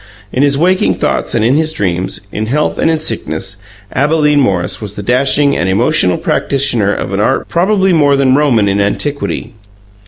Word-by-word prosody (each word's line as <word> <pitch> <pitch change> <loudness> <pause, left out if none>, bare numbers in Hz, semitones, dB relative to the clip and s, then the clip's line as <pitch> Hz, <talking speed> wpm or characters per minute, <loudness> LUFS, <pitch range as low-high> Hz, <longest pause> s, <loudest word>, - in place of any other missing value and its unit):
In 130 - 0
his 140 -1 +2
waking 185 +4 +2
thoughts - - -2
and 110 -1 +1
in 120 - +3
his 155 +2 +1
dreams, 90 - -2
in 110 +1 -3
health 150 +6 -1
and - - +2
in 160 -1 +1
sickness, 95 - -4 0.4
Abalene 150 +1 +2
Morris 95 -9 -1
was 105 -1 -7
the 105 - -6
dashing 140 +5 +2
and 90 - -1
emotional 100 - +2
practitioner 120 -7 0
of - - -4
an - - -1
art - - 0
probably 190 +1 +1
more 145 -3 +3
than 135 -2 +2
Roman 130 -7 +2
in 100 +1 +1
antiquity. 140 +8 -2
135 Hz, 180 wpm, -13 LUFS, 100-150 Hz, 0.4 s, in